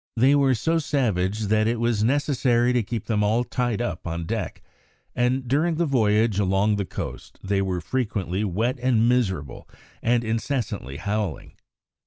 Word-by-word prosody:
They 130 +5 +5
were 140 -2 +4
so 165 +9 +1
savage 110 - 0
that 110 +1 +2
it 115 0 0
was 115 -2 +1
necessary 125 -2 +2
to 125 - +2
keep 110 0 -4
them 105 -2 0
all 110 +4 +2
tied 120 -2 -1
up 90 -6 -4
on 85 0 -3
deck, - - -4 0.5
and 125 +1 0
during 155 +6 +1
the 170 +2 +1
voyage 110 -6 +2
along 100 +2 +2
the 100 - -1
coast - - -7
they 100 0 0
were 95 -2 -2
frequently 100 -3 -2
wet 110 +7 -1
and 120 -3 +3
miserable, 95 - -1 0.3
and 120 0 +2
incessantly 110 - -3
howling. 100 -2 -3
115 Hz, 160 wpm, -24 LUFS, 100-125 Hz, 0.5 s, They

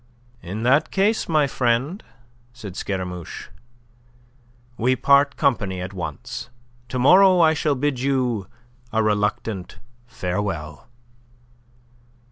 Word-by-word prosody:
"In 100 +6 -5
that 135 +5 +3
case, 205 +2 +1
my 155 -3 +3
friend," 130 - -1 0.5
said 105 -7 -9
Scaramouche, 90 -4 -5 1.3
"we 125 +2 +1
part 140 +3 +3
company 105 -10 0
at 90 +2 -6
once. 85 +4 -6 0.4
To 130 - -3
morrow 185 +8 +6
I 160 -2 +5
shall 150 -2 0
bid 135 -1 -1
you 125 -6 0 0.4
a 110 0 +1
reluctant 105 -2 -1 0.3
farewell." 90 - -4
120 Hz, 100 wpm, -22 LUFS, 95-140 Hz, 1.3 s, morrow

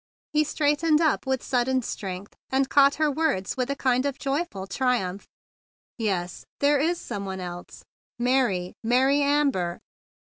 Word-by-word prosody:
He 305 0 +4
straight¬ 295 -1 +1
ened 320 -2 +3
up 315 -4 +1
with 265 -1 0
sudden 255 0 +1
strength, 195 -2 -6
and 265 0 +1
caught 280 0 +5
her 310 -1 +1
words 280 - 0
with 255 0 -2
a 280 - 0
kind 255 -2 +1
of 275 - -3
joy¬ 290 +5 -1
ful 190 -1 -7
triumph. 195 -3 -1 0.7
"Yes, 185 -5 -2 0.2
there 285 0 +3
is 335 +4 +1
some 200 - -5
one 190 -1 -5
else! 175 -1 -8 0.3
Mary! 240 -8 +1
Mary 260 +5 +3
Amber!" 280 -12 +1
260 Hz, 155 wpm, -25 LUFS, 195-285 Hz, 0.7 s, caught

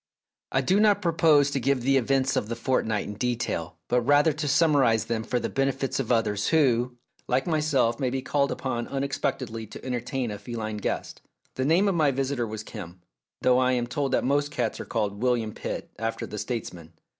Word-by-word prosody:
I 135 - +2
do 185 +9 +2
not 210 -1 +4
propose 155 -4 +4
to 140 - 0
give 135 +1 +1
the 135 +2 +3
events 135 +1 +1
of 105 - 0
the 115 - -2
fortnight 115 -3 0
in 105 - -5
detail, 110 -8 -2
but 125 0 +2
rather 145 +5 +4
to 150 +1 -3
summarise 140 -7 +3
them 115 -1 -2
for 125 +2 -1
the 115 - -2
benefit 135 0 -1
of 125 -3 -2
others 105 -3 +1
who, 125 -6 +2 0.3
like 130 +1 +1
myself, 150 -8 +1
may 130 - +1
be 130 +1 -3
called 140 +1 +1
upon 120 -3 -3
unexpectedly 135 -4 -3
to - - -11
entertain 125 -1 -2
a 105 - -6
feline 110 0 -5
guest. 105 - -4 0.3
The 130 - -2
name 170 +7 +4
of 195 - +2
my 155 -4 +3
visitor 135 -2 -1
was 110 0 -6
Kim, 95 -5 -9 0.4
though 125 0 +5
I 130 0 +3
am 120 -1 0
told 135 +2 -2
that - - +2
most 145 +2 +1
cats 120 -6 -2
are - - -5
called 105 -2 -2
William 120 -4 +1
Pitt, - - -5
after 115 0 -2
the 105 - -6
states 120 0 -3
man. 85 -2 -13
125 Hz, 200 wpm, -26 LUFS, 115-140 Hz, 0.4 s, though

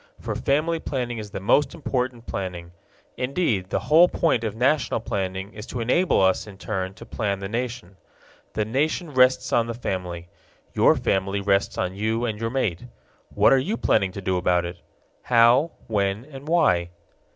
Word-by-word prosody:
For - - -4
family 155 +4 0
planning 125 -6 -3
is 105 -1 -7
the 100 - -5
most 140 - +2
important 125 -6 -3
planning. 90 -3 -5 0.5
Indeed, 125 - -1
the - - -1
whole 155 +8 +6
point 145 -8 +1
of 110 -2 -3
national 130 +2 +1
planning 95 -2 -4
is 105 +1 -9
to 125 - -5
enable 130 +11 +2
us 95 +2 +2
in 100 -2 -11
turn 95 -2 -4
to 115 - -11
plan 105 -3 -2
the 95 0 -5
nation. 115 -3 -4 0.6
The 105 - -1
nation 150 - -1
rests 130 0 +3
on 115 -1 +3
the 115 - -4
family. 90 -6 -4 0.5
Your - - +5
family 95 +1 0
rests 100 0 +1
on 90 0 -1
you 110 +4 -1
and 110 -3 -3
your 115 - -1
mate. 115 -6 -2 0.5
What - - +5
are 135 - +5
you 200 - -2
planning 95 -1 +2
to 100 - -6
do 95 -1 0
about 90 -1 +1
it? 85 0 -7 0.4
How, 120 +6 +5 0.2
when, 100 +1 -1
and 140 -1 -11
why? 140 - +2
115 Hz, 175 wpm, -24 LUFS, 95-130 Hz, 0.6 s, whole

